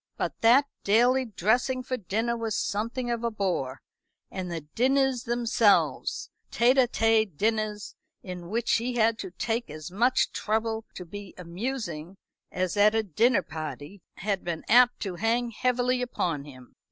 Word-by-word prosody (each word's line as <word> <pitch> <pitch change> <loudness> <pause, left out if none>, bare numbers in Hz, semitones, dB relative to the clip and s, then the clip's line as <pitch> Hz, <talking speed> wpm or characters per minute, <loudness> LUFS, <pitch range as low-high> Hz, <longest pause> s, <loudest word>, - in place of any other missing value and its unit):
But - - -3
that 245 +5 +6 0.2
daily 245 +5 +3
dressing 245 +5 0
for 255 0 -2
dinner 225 +2 -1
was 225 -2 -2
something 235 +4 -2
of 235 0 -2
a 235 - +1
bore; 180 - -2 0.5
and 185 -2 -5
the 165 -1 -3
dinners 260 - +1
themselves 230 -3 +1 0.2
tête 245 +3 +3
à 255 -2 +5
tête 220 - +2
dinners, 215 0 -1 0.3
in 180 -2 -7
which 235 +3 +1
he 240 +2 -3
had 225 -1 +2
to 190 - -5
take 225 +5 -3
as 155 +2 -8
much 240 +7 +2
trouble 220 +1 -1
to 180 - -7
be 205 +2 -9
amusing 180 - -5 0.3
as 180 0 -1
at 210 +2 +5
a 225 - +2
dinner 220 - +2
party, 155 +3 -7
had 200 0 -2
been 170 -2 -4
apt 245 +1 +5
to 185 -4 -4
hang 230 +4 0
heavily 250 +2 0
upon 170 - -2
him. 130 -4 -14
220 Hz, 155 wpm, -27 LUFS, 185-240 Hz, 0.5 s, that